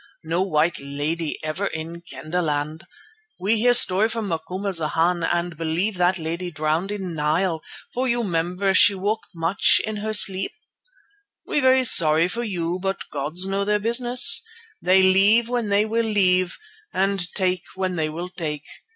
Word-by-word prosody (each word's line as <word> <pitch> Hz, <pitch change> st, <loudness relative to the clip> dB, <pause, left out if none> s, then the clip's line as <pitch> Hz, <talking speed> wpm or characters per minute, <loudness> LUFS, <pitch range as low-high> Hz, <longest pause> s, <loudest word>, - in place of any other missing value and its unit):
No 165 Hz, +3 st, -1 dB
white 170 Hz, -3 st, +1 dB
lady 145 Hz, +3 st, -3 dB
ever 155 Hz, +6 st, -2 dB
in 165 Hz, +1 st, -6 dB
Kendahland. 155 Hz, +1 st, -4 dB, 0.5 s
We 210 Hz, +4 st, +1 dB
hear 245 Hz, +2 st, +4 dB
story 205 Hz, 0 st, +4 dB
from 225 Hz, -3 st, -4 dB
Macumazana 170 Hz, -1 st, 0 dB
and 175 Hz, 0 st, -2 dB
believe 165 Hz, +6 st, -2 dB
that 180 Hz, +1 st, +2 dB
lady 170 Hz, +2 st, -4 dB
drowned 155 Hz, +4 st, -2 dB
in 190 Hz, -4 st, -5 dB
Nile, 160 Hz, +2 st, 0 dB, 0.3 s
for 255 Hz, +2 st, -1 dB
you 240 Hz, -1 st, 0 dB
'member 180 Hz, +1 st, -1 dB
she 200 Hz, +1 st, +6 dB
walk 205 Hz, +4 st, -2 dB
much 165 Hz, +4 st, +2 dB
in 215 Hz, -1 st, -4 dB
her 215 Hz, +1 st, -3 dB
sleep. 195 Hz, -, +1 dB, 0.9 s
We -, -, 0 dB
very 260 Hz, -1 st, +4 dB
sorry 160 Hz, -5 st, +5 dB
for 235 Hz, +6 st, -4 dB
you, 180 Hz, -4 st, -3 dB
but 195 Hz, 0 st, -4 dB
gods 155 Hz, +6 st, 0 dB
know 195 Hz, +1 st, -1 dB
their 210 Hz, +1 st, +1 dB
business. 240 Hz, +8 st, +2 dB, 0.4 s
They 185 Hz, +1 st, +4 dB
leave 200 Hz, +5 st, +5 dB
when 240 Hz, -3 st, -2 dB
they 200 Hz, +1 st, +2 dB
will 225 Hz, +1 st, -1 dB
leave, 185 Hz, -4 st, +2 dB, 0.3 s
and 190 Hz, -2 st, -1 dB
take 185 Hz, -2 st, 0 dB
when 185 Hz, -1 st, -2 dB
they 155 Hz, -2 st, -1 dB
will 170 Hz, +4 st, -6 dB
take. 150 Hz, -5 st, -5 dB
185 Hz, 155 wpm, -22 LUFS, 165-205 Hz, 0.9 s, she